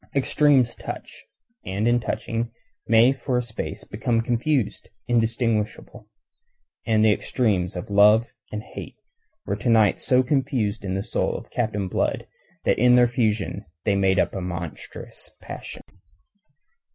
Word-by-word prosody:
Extremes 140 -2 +3
touch, - - -8 0.4
and 100 +4 -1
in 120 0 +4
touching 115 0 -3 0.4
may 115 +3 +5
for 130 -1 -2
a 125 - 0
space 115 -2 -5
become 115 +2 -1
confused, 120 +1 -1 0.2
indistinguishable. 115 -1 -1 0.8
And 110 -1 +3
the 110 - +6
extremes 100 -7 0
of 90 +3 -6
love 105 +3 +6 0.3
and 105 0 -4
hate - - -9 0.5
were 100 - -1
to 110 - -2
night 110 -3 +4
so 130 0 +3
confused 130 -6 0
in 95 -1 -2
the 95 - -2
soul - - -1
of - - -12
Captain 110 -5 -1
Blood - - -1 0.4
that - - +2
in 125 +1 +6
their 125 0 +6
fusion 110 -4 -1 0.2
they 100 - +2
made 95 -1 +2
up - - +1
a 95 - -4
monstrous 85 -2 -7
passion. - - -9
115 Hz, 140 wpm, -24 LUFS, 100-125 Hz, 0.8 s, the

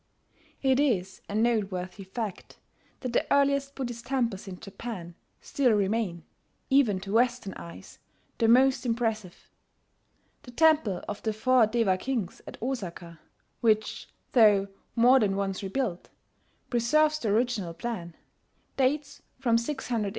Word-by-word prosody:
It 265 0 +3
is 195 -10 0
a 205 - -4
noteworthy 200 -4 -1
fact 205 0 -6 0.4
that 250 -2 -4
the - - 0
earliest 280 0 +2
Buddhist 240 -3 -5
temples 235 -8 -1
in 185 -2 -8
Japan 195 -4 -7 0.3
still 255 -5 +1
remain, 200 -4 0 0.5
even 245 -9 +4
to 195 +1 -6
Western 240 -3 +1
eyes, 170 - -11 0.4
the 225 - +3
most 255 +2 +5
impressive. 225 -6 -3 0.9
The 270 - -13
Temple 300 - +3
of 210 - -5
the 220 - -1
Four 245 +1 +4
Deva 215 -5 +1
Kings 235 -8 -3
at - - -9
Osaka 175 -9 -5 0.4
which, 215 -2 0 0.2
though 205 -5 +5 0.3
more 250 +3 +6
than 200 -4 +1
once 195 -1 -2
rebuilt, 195 -2 -3 0.6
preserves 305 +6 +3
the 225 - -2
original 210 -6 0
plan 175 -6 -5 0.6
dates 280 +2 0 0.2
from 245 -3 +1
600 235 -4 -2
A.D. - - -1
230 Hz, 130 wpm, -28 LUFS, 195-255 Hz, 0.9 s, more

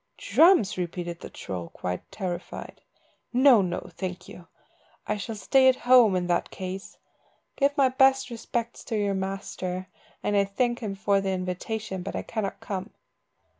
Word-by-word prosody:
"Drums!" 325 - +4
repeated 175 -1 -4
the - - -9
troll, 90 -3 -6
quite 90 0 -5
terrified. 180 -3 -6 0.5
"No, 255 -3 +6
no! 180 -2 -2
Thank 185 -1 -5
you. 175 - -12 0.6
I 210 - -1
shall 220 +2 -5
stay 260 +5 +4
at 260 - +4
home 245 -6 +7
in 180 -1 0
that 175 0 0
case. 190 +1 -7 0.6
Give 280 0 +1
my 270 -2 +5
best 265 -1 +3
respects 235 0 -4
to 225 - -3
your 205 -1 +1
master, 190 -1 -4 0.3
and 205 - 0
I 200 0 +4
thank 240 +5 0
him 210 -4 -4
for 200 0 +2
the 195 - -2
invitation, 190 +2 -3
but 190 - -5
I - - -2
cannot 200 -3 -3
come. 195 -2 -4
200 Hz, 160 wpm, -27 LUFS, 185-235 Hz, 0.6 s, home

